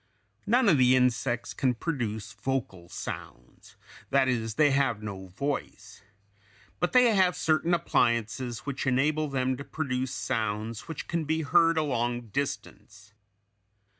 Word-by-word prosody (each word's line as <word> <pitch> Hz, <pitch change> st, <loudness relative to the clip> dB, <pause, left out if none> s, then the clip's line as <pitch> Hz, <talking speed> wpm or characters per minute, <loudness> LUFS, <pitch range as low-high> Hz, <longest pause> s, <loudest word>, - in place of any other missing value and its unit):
None 240 Hz, +3 st, +4 dB
of 160 Hz, -8 st, +5 dB
the 130 Hz, 0 st, +5 dB
insects 125 Hz, -1 st, 0 dB
can 130 Hz, -2 st, 0 dB
produce 110 Hz, -, -3 dB
vocal 105 Hz, -5 st, -4 dB
sounds, -, -, -9 dB, 0.3 s
that 135 Hz, -1 st, +3 dB
is, 115 Hz, -3 st, -1 dB
they 145 Hz, +1 st, +4 dB
have 135 Hz, -6 st, +1 dB
no 95 Hz, -2 st, -6 dB
voice, 105 Hz, -1 st, -5 dB, 0.8 s
but 175 Hz, -, 0 dB
they 250 Hz, -2 st, +5 dB
have 185 Hz, -3 st, +3 dB
certain 165 Hz, 0 st, +2 dB
appliances 120 Hz, -4 st, 0 dB
which 140 Hz, -1 st, -3 dB
enable 150 Hz, +4 st, +2 dB
them 130 Hz, -2 st, 0 dB
to 140 Hz, -, -6 dB
produce 130 Hz, -5 st, -3 dB
sounds 110 Hz, 0 st, -3 dB
which 160 Hz, -3 st, -6 dB
can 165 Hz, -2 st, -2 dB
be 160 Hz, +1 st, 0 dB
heard 165 Hz, +3 st, +4 dB
a 155 Hz, -, +3 dB
long 120 Hz, -4 st, -2 dB
distance. 105 Hz, -5 st, -5 dB
130 Hz, 135 wpm, -28 LUFS, 115-155 Hz, 0.8 s, of